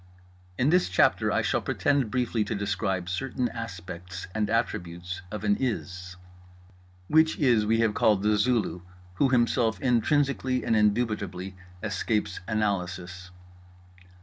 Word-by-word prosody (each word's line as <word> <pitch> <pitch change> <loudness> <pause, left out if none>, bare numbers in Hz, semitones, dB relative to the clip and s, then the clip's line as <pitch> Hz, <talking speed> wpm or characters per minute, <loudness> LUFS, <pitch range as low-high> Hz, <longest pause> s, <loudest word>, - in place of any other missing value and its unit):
In 135 +4 +2
this 180 +1 +3
chapter 90 - +3
I - - +1
shall - - +1
pretend 140 -5 +1
briefly 120 -2 0
to 110 - -3
describe 95 -2 -2
certain 120 +7 -2
aspects 90 -4 -7
and 105 -1 -1
attributes 90 -5 -2
of 105 -1 -6
an 100 -1 +2
IS. 95 -7 -3 0.9
Which 160 +4 +4
IS 120 -8 +3
we 115 +1 +3
have 110 -2 +2
called 105 -2 +3
The 105 0 +3
Zulu, 105 -4 +1 0.4
who 135 - +3
Himself 120 -2 +2
intrinsically 130 +1 +1
and 115 - +2
indubitably 105 -4 0 0.3
escapes 105 0 -1
analysis. 90 -4 -2
105 Hz, 125 wpm, -27 LUFS, 95-120 Hz, 0.9 s, Which